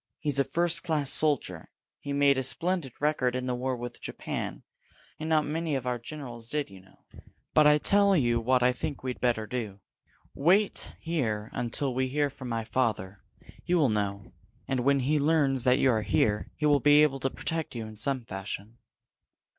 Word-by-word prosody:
He's 145 -3 0
a - - +5
first 165 +5 +1
class 155 -5 +1
soldier. 135 - +1 0.3
He 140 - -6
made 140 0 +4
a 130 - 0
splendid 165 +2 0
record 145 -4 +1
in 130 0 -2
the 125 - -1
war 125 +1 -2
with 120 0 -7
Japan - - -5 0.6
and 155 +1 -4
not 155 -1 +3
many 160 0 -2
of 130 -2 -3
our 125 -1 -1
generals 120 -3 -9
did, 150 -5 -2
you 95 -1 -12
know. 95 - -25 0.5
But 155 -1 +6
I 150 0 +6
tell 200 +5 +3
you 120 -4 +2
what 125 +2 +2
I 125 0 +4
think 150 +1 -5
we'd 130 -1 -4
better 120 -3 +1
do. 105 -3 -5 0.5
Wait 190 +8 +1
here 115 -11 -2
until 125 +3 -2
we 130 +1 0
hear 145 +2 0
from 130 -2 -8
my 115 -1 -2
father. 110 -6 -1 0.4
He 180 - +1
will 150 -7 +3
know. 100 -2 -3 0.3
And 130 - -1
when 140 +2 +2
he 150 +4 +1
learns 140 -4 +2
that 125 0 +5
you 135 -2 +3
are 110 -2 +1
here, 105 +2 +1
he 150 - -2
will 145 -1 +4
be 145 +2 +6
able 135 -3 +1
to 135 - 0
protect 160 0 -4
you 115 -2 -4
in 110 0 -10
some 125 +3 -1
fashion." 100 +3 -7
130 Hz, 195 wpm, -28 LUFS, 115-150 Hz, 0.6 s, But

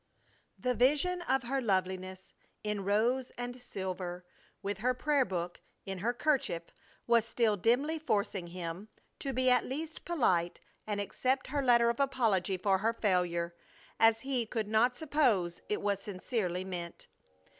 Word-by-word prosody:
The 250 0 0
vision 295 +9 +2
of 270 -6 +1
her 270 +3 -1
loveliness 185 -3 -2 0.3
in 210 -2 -2
rose 235 +6 +1
and 245 +1 -5
silver, 185 -5 -5 0.4
with 200 0 -3
her 250 +3 +1
prayer 285 0 +2
book 175 -2 -4 0.2
"in 195 -1 -4
her 225 +6 +1
'kerchief" 245 - 0 0.3
was 235 -1 +4
still 230 -1 +1
dimly 255 - +1
forcing 200 - -1
him 175 +3 -6 0.3
to 275 - -2
be 255 0 +3
at 250 - +4
least 310 +4 -5
polite 185 - +1 0.3
and 205 -1 -1
accept 255 +6 0
her 285 +1 0
letter 235 -2 +5
of 235 - -8
apology 225 -9 +1
for 190 +1 +2
her 225 +4 +1
failure, 180 -5 0 0.5
as 225 0 +5
he 260 -4 -1
could 215 -2 -3
but 240 +3 +4
suppose 245 - +1
it 210 - -1
was 200 -1 0
sincerely 185 -2 -2
meant. 175 -2 -6
220 Hz, 150 wpm, -32 LUFS, 185-255 Hz, 0.5 s, letter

